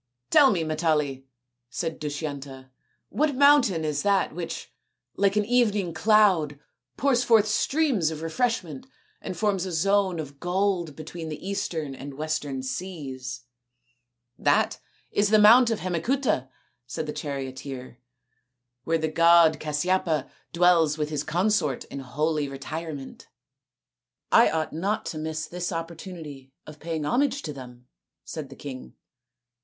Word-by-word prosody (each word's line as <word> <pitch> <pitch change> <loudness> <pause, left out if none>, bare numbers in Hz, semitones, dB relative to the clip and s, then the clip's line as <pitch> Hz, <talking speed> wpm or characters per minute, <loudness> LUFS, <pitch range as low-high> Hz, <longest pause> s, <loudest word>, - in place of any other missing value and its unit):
"Tell 280 -2 +7
me, 180 -8 +1
Matali," 150 -4 -1 0.4
said 165 +4 -4
Dushyanta, 140 -3 -6 0.4
"what 300 -1 0
mountain 260 - +5
is 150 -1 -1
that 200 -5 +1
which, 170 0 -6 0.4
like 200 0 +2
an 210 -1 +2
evening 210 -7 +1
cloud, 185 -8 +3 0.4
pours 255 -1 +2
forth 225 -3 +5
streams 260 - +1
of 160 0 -6
refreshment 170 - -2 0.3
and 185 - -6
forms 200 -2 +1
a - - -4
zone 190 +1 +1
of 140 -2 -7
gold 180 -3 0
between 160 +1 -7
the 155 +4 -7
eastern 160 -7 -3
and 135 +1 -8
the - - -13
western 145 -3 -3
seas? 130 -4 -5 0.4
" 120 0 -45
" 120 0 -54
That - - +2 0.3
is 205 0 +2
the 215 - +5
mount 230 +4 +7
of 225 - -2
Hemacuta," 185 - 0 0.4
said 155 +5 -4
the 150 - -4
charioteer, 130 -3 -6 0.4
" 125 0 -56
where 165 0 +2
the 160 0 -1
god 165 0 +5
Casyapa 155 0 0 0.2
dwells 170 -3 +4
with 150 0 -2
his 150 -1 -2
consort 175 - 0
in 140 - -5
holy 150 +3 -1
retirement." 140 +1 -7 0.5
" - - -58
I - - +6
ought 160 -1 -2
not 195 +7 -1
to 155 - -5
miss 155 0 -3
this 175 +2 -4
opportunity 165 -5 -7
of 155 0 -12
paying 160 -2 -3
homage 275 - +1
to 150 - -5
them," 125 -2 -11 0.4
said 155 -4 -6
the 135 - -11
king. 130 - -9
160 Hz, 145 wpm, -26 LUFS, 140-190 Hz, 0.5 s, Tell